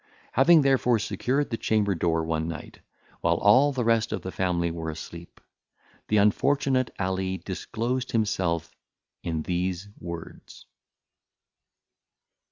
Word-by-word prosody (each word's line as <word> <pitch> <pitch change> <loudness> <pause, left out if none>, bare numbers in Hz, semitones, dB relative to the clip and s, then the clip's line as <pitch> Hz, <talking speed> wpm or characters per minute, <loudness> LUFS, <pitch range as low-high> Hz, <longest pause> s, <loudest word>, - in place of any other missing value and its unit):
Having, 155 +4 +6
therefore, 130 -3 +3
secured 125 +7 -1
the 115 - -1
chamber 105 -2 +1
door 80 -1 0
one 80 0 -1
night, 85 -2 -7 0.4
while 85 - +2
all 130 +10 +5
the 130 -3 -1
rest 115 -1 +2
of - - -3
the 95 - -4
family 85 -3 0
were 80 -1 -4
asleep, 85 +2 -9 0.7
the 105 - +2
unfortunate 130 +5 +2
Ali 95 0 -1
disclosed 125 +8 -3
himself 95 -7 -1 0.5
in 80 -2 -3
these 90 +2 -2
words. 85 -1 -9
100 Hz, 120 wpm, -26 LUFS, 85-125 Hz, 0.7 s, Having